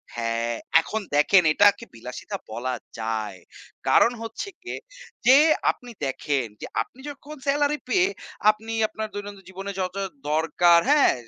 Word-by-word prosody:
হ্যাঁ, 115 0 -1 0.3
এখন 220 +6 -4
দেখেন 175 +6 +5
এটাকে 205 +4 +4
বিলাসিতা 125 +2 -7
বলা 125 +3 -3 0.3
যায়। 110 -4 -3 0.5
কারণ 235 - +5
হচ্ছে 225 - -5
গিয়ে 370 - -6 0.5
যে 255 - +8 0.4
আপনি 245 -1 -13
দেখেন 135 0 -1 0.2
যে, - - -4 0.2
আপনি 255 - -9
যখন 290 +1 -10
সেলারি 290 +1 +2
পেয়ে 375 -1 +3 0.4
আপনি 215 +1 -1 0.2
আপনার 220 0 -5
দৈনন্দিন 205 -1 -8
জীবনে 195 +1 -6
যত 185 0 -3 0.4
দরকার 170 +2 +4
হ্যাঁ? 295 -1 +5
195 Hz, 135 wpm, -25 LUFS, -, 0.5 s, যে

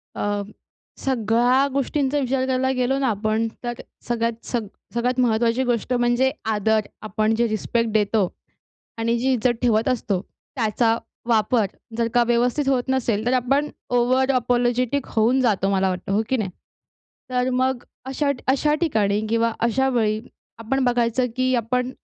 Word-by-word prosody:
अ, 205 0 -1 0.6
सगळ्या 245 +2 +2
गोष्टींचा 280 +1 0
विचार 260 0 0
करायला 260 0 +1
गेलो 255 +2 +1
ना, 270 - +1
आपण, 215 +1 0 0.2
तर 240 - -2 0.4
सगळ्यात 230 -1 -2
सग 230 -4 -2 0.3
सगळ्यात 250 +2 0
महत्त्वाची 235 +1 +2
गोष्ट 245 0 -1
म्हणजे 240 +2 +2
आदर. 220 0 +2 0.2
आपण 215 +1 0
जे 235 0 +2
रिस्पेक्ट 225 +1 -1
देतो. 210 -2 +2 0.7
आणि 230 +1 0
जी 265 +2 +1
इज्जत 240 0 +1
ठेवत 225 -1 +2
असतो, 210 -7 -1 0.3
त्याचा 225 0 +1 0.3
वापर 225 -1 +3 0.3
जर 230 -1 +1
का 240 -1 +5
व्यवस्थित 245 +4 +1
होत 250 -2 +2
नसेल, 235 -5 0
तर 245 - +2
आपण 275 +4 +1 0.3
ओव्हर 260 +2 +3
अपोलॉजिटिक 245 +1 +1
होऊन 235 +4 +3
जातो, 200 -5 +2
मला 190 -1 +2
वाटतं, 185 +1 -4
हो 210 - +3
की 260 - +2
नाही? 200 -4 -2 0.8
तर 250 0 +1
मग 255 0 0 0.2
अशा 280 +2 0 0.2
अशा 295 +3 +3
ठिकाणी 210 -10 +1
किंवा 230 0 +1
अशा 265 +3 +1
वेळी, 220 -4 +1 0.4
आपण 260 +4 -1
बघायचं, 240 0 +1
की 255 0 +1
आपण 250 +2 -1
240 Hz, 150 wpm, -22 LUFS, 220-255 Hz, 0.8 s, का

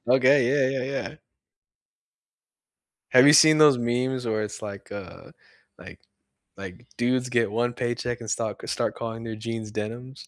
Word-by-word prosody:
Okay, 130 +1 +4
yeah, 135 -1 +1
yeah, 125 - -3 0.2
yeah. 155 - -13 2.0
Have 130 +2 +7
you 145 - +7
seen 155 0 +7
those 150 -4 +6
meme's 125 +2 -2
where 110 -1 -1
it's, 105 +1 -7
like, 100 -2 -9
uh 95 -4 -10 0.5
like - - -13 0.6
like, 95 +4 -10
dudes 125 +1 0
get 115 -4 +1
1 120 +2 -1
paycheck 120 0 -3
and 115 - -7
stop 110 -1 -3
c - - -9
start - - -2
calling 115 0 -6
their 110 -1 -6
jeans 110 -1 -6
"Denims"? 120 +6 -7
120 Hz, 160 wpm, -25 LUFS, 110-130 Hz, 2.0 s, Have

